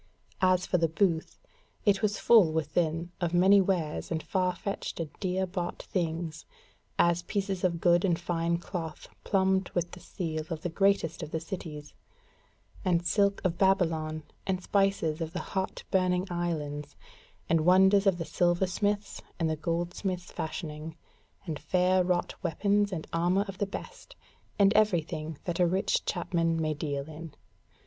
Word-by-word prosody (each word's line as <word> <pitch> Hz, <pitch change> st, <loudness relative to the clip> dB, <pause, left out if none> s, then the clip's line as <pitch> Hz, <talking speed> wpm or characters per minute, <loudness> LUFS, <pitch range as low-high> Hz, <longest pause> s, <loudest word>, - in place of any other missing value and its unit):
As 185 Hz, -1 st, +3 dB
for 180 Hz, -, +1 dB
the 165 Hz, -, +3 dB
booth, 165 Hz, 0 st, 0 dB, 0.5 s
it 200 Hz, -2 st, +3 dB
was 210 Hz, -1 st, +1 dB
full 215 Hz, -9 st, +6 dB
within 160 Hz, +2 st, -1 dB
of 175 Hz, 0 st, 0 dB
many 195 Hz, +3 st, +6 dB
wares 180 Hz, -5 st, -1 dB
and 160 Hz, -1 st, -2 dB
far 185 Hz, -1 st, 0 dB
fetched 200 Hz, -1 st, -4 dB
and 160 Hz, -3 st, -3 dB
dear 190 Hz, 0 st, 0 dB
bought 175 Hz, -1 st, -4 dB
things; 165 Hz, -3 st, -3 dB, 0.5 s
as 170 Hz, 0 st, +3 dB
pieces 195 Hz, +1 st, -2 dB
of 170 Hz, -2 st, +1 dB
good 175 Hz, 0 st, +4 dB
and 175 Hz, -4 st, +2 dB
fine 170 Hz, -1 st, 0 dB
cloth 170 Hz, -2 st, -6 dB
plumbed 190 Hz, -1 st, +2 dB
with 175 Hz, -1 st, 0 dB
the 180 Hz, -, -10 dB
seal 160 Hz, -3 st, -4 dB
of 160 Hz, -2 st, -5 dB
the 175 Hz, -, -1 dB
greatest 195 Hz, -3 st, +1 dB
of 155 Hz, -, -5 dB
the 160 Hz, -, -2 dB
cities; 160 Hz, -4 st, -7 dB, 0.9 s
and 175 Hz, -2 st, +1 dB
silk 200 Hz, +2 st, +2 dB
of 170 Hz, -2 st, 0 dB
Babylon, 160 Hz, -5 st, +1 dB, 0.2 s
and 185 Hz, -1 st, -1 dB
spices 195 Hz, -5 st, +1 dB
of 165 Hz, 0 st, -3 dB
the 185 Hz, -, -2 dB
hot 190 Hz, -1 st, -2 dB
burning 185 Hz, -1 st, +2 dB
islands, 150 Hz, -4 st, -3 dB, 0.5 s
and 165 Hz, -1 st, +3 dB
wonders 190 Hz, +4 st, +5 dB
of 190 Hz, -3 st, +4 dB
the 165 Hz, -, -4 dB
silversmith's 190 Hz, +4 st, 0 dB, 0.2 s
and 160 Hz, -2 st, +1 dB
the -, -, 0 dB
goldsmith's 175 Hz, +3 st, -3 dB
fashioning, 160 Hz, 0 st, -5 dB, 0.5 s
and 155 Hz, -5 st, -4 dB
fair 185 Hz, 0 st, +2 dB
wrought 180 Hz, -1 st, 0 dB
weapons 200 Hz, +3 st, +1 dB
and 165 Hz, -4 st, -4 dB
armour 175 Hz, +4 st, +2 dB
of 195 Hz, -1 st, -8 dB
the 205 Hz, -, 0 dB
best, 475 Hz, -, -9 dB, 0.4 s
and 200 Hz, 0 st, +5 dB
every 210 Hz, -6 st, +4 dB
thing 155 Hz, 0 st, -6 dB
that 175 Hz, -1 st, -3 dB
a 175 Hz, -, +5 dB
rich 190 Hz, +3 st, +1 dB
chapman 170 Hz, -2 st, 0 dB
may 155 Hz, -1 st, 0 dB
deal 145 Hz, -2 st, -3 dB
in. 160 Hz, 0 st, -9 dB
175 Hz, 160 wpm, -29 LUFS, 165-190 Hz, 0.9 s, full